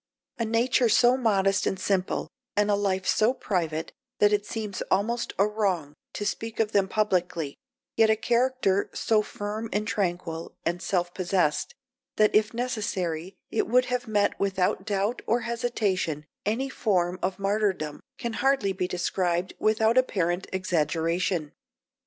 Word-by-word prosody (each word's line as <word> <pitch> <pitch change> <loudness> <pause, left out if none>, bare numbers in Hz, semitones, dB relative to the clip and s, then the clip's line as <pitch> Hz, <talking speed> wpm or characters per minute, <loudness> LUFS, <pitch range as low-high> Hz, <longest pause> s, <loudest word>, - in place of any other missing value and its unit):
A 230 - +1
nature 235 +2 +2
so 240 +3 +5
modest 200 -6 +2
and 190 - -1
simple, 190 -1 0 0.3
and 205 0 +3
a - - +4
life 190 -2 0
so 230 +4 +3
private 165 -9 -2 0.3
that 210 0 +4
it 205 0 0
seems 210 -4 -4
almost 235 +5 0
a 200 - +4
wrong 195 -9 -1 0.2
to 205 - -4
speak 225 +3 -3
of 220 -1 +2
them 200 -2 +3
publicly, 180 -8 0 0.4
yet 225 -1 +5
a 220 - +5
character 235 -4 +1
so 220 -1 +2
firm 210 +2 -5
and 210 +1 -1
tranquil 175 -5 -2
and 175 +1 -1
self 175 -2 -1
possessed 180 -4 0 0.4
that 215 0 +4
if 215 0 +3
necessary 200 -8 -2 0.2
it - - 0
would 250 +3 +4
have 245 -1 -1
met 205 -2 +1
without 190 -1 0
doubt 205 +3 0
or 235 +2 +2
hesitation 215 - -1 0.2
any 240 +6 0
form 185 -8 0
of 185 0 -1
martyrdom, 195 -7 -1 0.2
can 235 -4 -3
hardly 265 -5 +2
be 185 -1 -2
described 180 0 -1
without 220 +3 +3
apparent 180 -7 0
exaggeration. 165 -2 0
200 Hz, 145 wpm, -27 LUFS, 180-220 Hz, 0.4 s, so